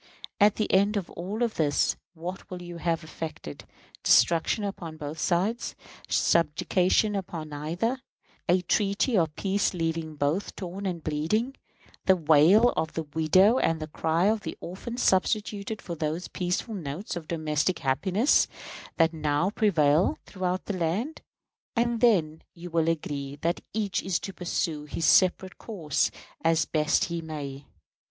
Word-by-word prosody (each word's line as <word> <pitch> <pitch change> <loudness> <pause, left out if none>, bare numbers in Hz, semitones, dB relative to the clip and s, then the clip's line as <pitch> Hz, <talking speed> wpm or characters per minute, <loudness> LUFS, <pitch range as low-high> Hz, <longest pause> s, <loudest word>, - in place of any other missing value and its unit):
At 205 0 +5
the 215 - -1
end 200 +2 +4
of 195 - -4
all 205 +7 -2
this 155 -9 +1 0.2
what 175 +4 -7
will 180 - -6
you 175 -1 -8
have 165 -1 -1
effected? 155 - -7 0.4
Destruction 170 +5 +4
upon 170 -5 -5
both 150 +1 -6
sides; 195 +7 0 0.3
subjugation 180 +6 +2
upon 170 -5 -5
neither; 170 - -2 0.5
a 180 +1 +3
treaty 200 +6 +1
of 160 -5 +1
peace 195 -1 0
leaving 165 -2 -2
both 150 +7 -1
torn 190 +1 -5
and 170 -3 -4
bleeding; 210 - -1 0.5
the 190 - +7
wail 165 +8 +5
of 160 -8 -2
the 160 - -2
widow 185 - +4
and 165 -1 +1
the 155 - -4
cry 160 +3 0
of 215 +1 +2
the - - -6
orphan 215 +7 -7
substituted 210 0 0
for 175 - -5
those 160 +2 -3
peaceful 180 +5 -2
notes 175 +2 -5
of 165 -3 -6
domestic 155 +1 0
happiness 190 - +2 0.5
that 165 0 +3
now 155 +4 0
prevail 165 -7 +3
throughout 185 -1 -3
the 205 - -3
land; 195 - -2 0.5
and 235 0 +1
then 165 -10 +3
you 175 0 -9
will 165 0 +2
agree 145 -4 -3
that 170 +1 0
each 205 -3 -1
is 190 -3 -1
to 195 - -6
pursue 165 -4 -2
his 160 +2 -3
separate 185 +2 +3
course 165 -10 -1 0.3
as 165 0 +3
best 155 -1 +1
he 170 -1 -4
may. 145 -3 -6
175 Hz, 145 wpm, -27 LUFS, 155-200 Hz, 0.5 s, the